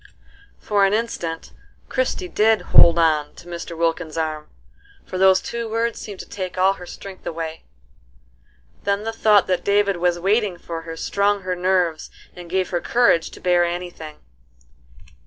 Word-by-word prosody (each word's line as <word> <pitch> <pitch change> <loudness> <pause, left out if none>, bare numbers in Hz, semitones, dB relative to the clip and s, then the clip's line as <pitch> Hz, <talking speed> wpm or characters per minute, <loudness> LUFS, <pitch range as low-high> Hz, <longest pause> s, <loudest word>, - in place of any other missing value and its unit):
'" 405 0 -28
For 205 -1 +1
an 195 +1 +3
instant 175 -8 -4 0.3
Christie - - -1
did 220 - +3
"hold 170 -1 +6
on" 155 -3 +2
to 175 - -14
Mr. 170 -1 -7
Wilkins's 165 -1 -1
arm, 155 -1 -3 0.6
for 185 - -5
those 190 0 +6
two 235 -1 -5
words 230 +1 -1
seemed 205 -3 -8
to - - -12
take 185 -3 -6
all 190 +1 +4
her 180 -2 -11
strength 190 0 -10
away. 165 -1 -5 1.2
Then 200 +1 0
the 225 +1 -3
thought 215 -3 +4
that 180 -2 -1
David 200 -1 +2
was 175 0 +1
waiting 200 +1 +1
for 165 -1 -6
her 165 - -6
strung 200 +2 0
her 185 0 -2
nerves 180 -3 0 0.3
and 175 -1 -10
gave 185 0 -1
her 175 -1 -1
courage 235 -9 +3
to - - -13
bear 175 -1 +3
any 175 +1 -3
thing. 155 -3 -10
185 Hz, 170 wpm, -22 LUFS, 170-205 Hz, 1.2 s, hold